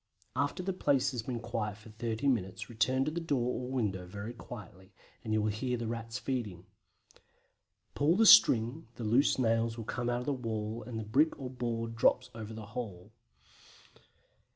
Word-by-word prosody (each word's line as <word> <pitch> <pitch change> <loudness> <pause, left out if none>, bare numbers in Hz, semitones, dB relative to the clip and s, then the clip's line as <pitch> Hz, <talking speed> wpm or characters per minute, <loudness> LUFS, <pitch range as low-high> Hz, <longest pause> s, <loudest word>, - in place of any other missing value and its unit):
After 145 +6 -1
the 190 +1 -1
place 140 -6 +2
has 125 -3 -3
been 120 +1 -4
quiet 115 -3 -3
for 105 +2 -14
thirty 115 +3 -2
minutes 105 -3 -1
return 130 +4 +2
to 155 - -1
the 170 - -2
door 130 -7 0
or - - -6
window 100 -8 -1
very 100 +5 -6
quietly, 100 -5 -11 0.3
and 110 - -4
you 110 -1 +2
will 105 - +1
hear 125 +4 -2
the 115 - -4
Rats 115 +1 -4
feeding. 110 -10 -3 1.3
Pull 150 +4 +3
the 225 +3 +4
string, 120 - +7
the 120 - -6
loose 120 +6 +3
nails 115 -1 +1
come 120 +2 -2
out 120 0 0
of - - -6
the 145 - +1
wall 110 -2 -3
and 120 -3 -5
the 110 - -3
brick 140 +9 +2
or 130 -2 -5
board 115 -2 -3
drops 125 +2 +2
over 110 -1 -7
the 110 -1 -7
hole. 105 -6 -6
115 Hz, 180 wpm, -32 LUFS, 110-130 Hz, 1.3 s, string